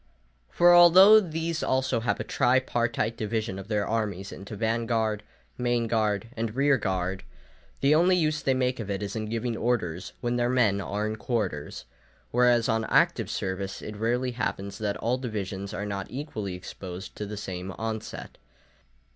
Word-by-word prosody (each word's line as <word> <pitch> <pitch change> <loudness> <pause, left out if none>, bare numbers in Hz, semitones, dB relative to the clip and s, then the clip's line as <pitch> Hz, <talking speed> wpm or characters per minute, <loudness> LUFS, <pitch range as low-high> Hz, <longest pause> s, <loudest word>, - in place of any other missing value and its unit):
For 175 - +5
although 185 +5 +9
these 165 -3 -3
also 130 -2 +1
have 115 0 -1
a - - -2
tripartite 120 -3 +1
division 110 -2 -2
of 95 - -9
their 105 -2 0
armies 105 -4 -2
into 100 +2 -8
van 115 +2 -1
guard, 110 -3 0 0.4
main 120 -1 +1
body, 110 -1 0
and 115 -1 -3
rear 140 0 +3
guard, 95 -1 -2 0.6
the 140 +2 +4
only 175 +4 +4
use 155 -3 +1
they 135 - +1
make 125 -1 0
of 105 -3 -5
it 100 0 -2
is 100 +1 -5
in 110 -1 -2
giving 115 +1 -2
orders 95 -8 -2
when 120 0 -1
their 120 0 +1
men 110 -6 +2
are 105 +2 -2
in 110 0 -3
quarters; 100 - -3 0.5
whereas 120 -1 +4
on 110 -2 +1
active - - +2
service 95 +1 -3
it 105 - -6
rarely 120 +4 0
happens 100 -3 -4
that 105 -2 -2
all 120 +3 -1
divisions 100 -5 -4
are 105 -1 -4
not 100 -2 -4
equally 110 - -5
exposed 90 +1 -8
to 105 - -5
the 105 +1 -6
same 95 -1 -5
onset. 110 +1 -6
110 Hz, 170 wpm, -27 LUFS, 100-125 Hz, 0.6 s, although